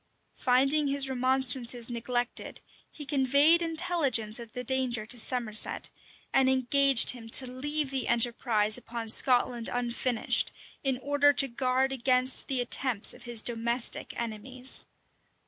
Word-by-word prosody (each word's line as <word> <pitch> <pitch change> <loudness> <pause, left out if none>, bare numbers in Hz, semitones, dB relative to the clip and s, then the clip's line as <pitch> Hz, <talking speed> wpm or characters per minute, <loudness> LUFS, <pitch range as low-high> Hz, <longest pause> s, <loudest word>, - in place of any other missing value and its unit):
Finding 275 +4 +2
his 275 0 -1
remonstrances 255 -2 0
neglected, 240 +1 -4 0.3
he 295 - -11
conveyed 280 +4 +3
intelligence 295 -10 0
of 230 -2 -11
the 250 - -6
danger 250 -3 -2
to 240 +2 -4
Somerset, 230 -3 +1 0.4
and 265 -1 +2
engaged 265 0 +5
him 230 -3 -9
to 260 - +3
leave 280 +3 -4
the 265 -2 -3
enterprise 235 -2 +1
upon 230 -2 -7
Scotland 245 -1 +2
unfinished, 245 0 0 0.3
in 265 -2 0
order 285 0 +2
to 275 +1 +3
guard 260 +1 -2
against 255 0 +1
the 260 -2 0
attempts 245 -2 +2
of - - -15
his 235 -2 -2
domestic 235 +1 -2
enemies. 245 +3 -6
255 Hz, 130 wpm, -27 LUFS, 235-270 Hz, 0.4 s, engaged